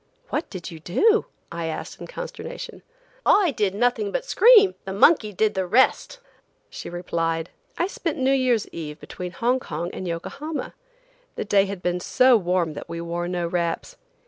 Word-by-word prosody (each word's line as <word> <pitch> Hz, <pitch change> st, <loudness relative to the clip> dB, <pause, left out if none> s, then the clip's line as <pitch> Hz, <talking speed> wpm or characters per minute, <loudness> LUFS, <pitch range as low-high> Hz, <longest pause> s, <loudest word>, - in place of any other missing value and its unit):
"What 300 Hz, -, -2 dB
did 185 Hz, -4 st, -7 dB
you 165 Hz, -, -9 dB
do?" 425 Hz, -, +2 dB, 0.2 s
I 170 Hz, -1 st, -3 dB
asked 160 Hz, -, -6 dB
in -, -, -7 dB
consternation. -, -, -7 dB, 0.4 s
"I 385 Hz, -9 st, +4 dB
did 205 Hz, -6 st, -1 dB
nothing 245 Hz, -, +1 dB
but -, -, -2 dB
scream; 440 Hz, -6 st, +6 dB
the 190 Hz, -, -5 dB
monkey 215 Hz, +1 st, +4 dB
did 210 Hz, +2 st, +1 dB
the 190 Hz, -1 st, -1 dB
rest!" 260 Hz, -, +2 dB, 0.5 s
she -, -, -7 dB
replied. 165 Hz, -1 st, -2 dB, 0.3 s
I 345 Hz, -, +2 dB
spent 335 Hz, -4 st, -3 dB
New 265 Hz, 0 st, +2 dB
Year's 255 Hz, -5 st, +2 dB
eve 150 Hz, -2 st, -7 dB
between 180 Hz, 0 st, -7 dB
Hong 245 Hz, +6 st, +1 dB
Kong 170 Hz, -5 st, -5 dB
and 185 Hz, -, -5 dB
Yokohama. 280 Hz, -, -5 dB, 0.6 s
The -, -, -3 dB
day 200 Hz, -1 st, +4 dB
had 195 Hz, -2 st, -6 dB
been 180 Hz, 0 st, 0 dB
so 255 Hz, +7 st, +4 dB
warm 180 Hz, -5 st, +1 dB
that -, -, -8 dB
we 170 Hz, -, -5 dB
wore 170 Hz, +1 st, -3 dB
no 175 Hz, -1 st, -2 dB
wraps. 170 Hz, -, -2 dB
195 Hz, 170 wpm, -24 LUFS, 170-275 Hz, 0.6 s, scream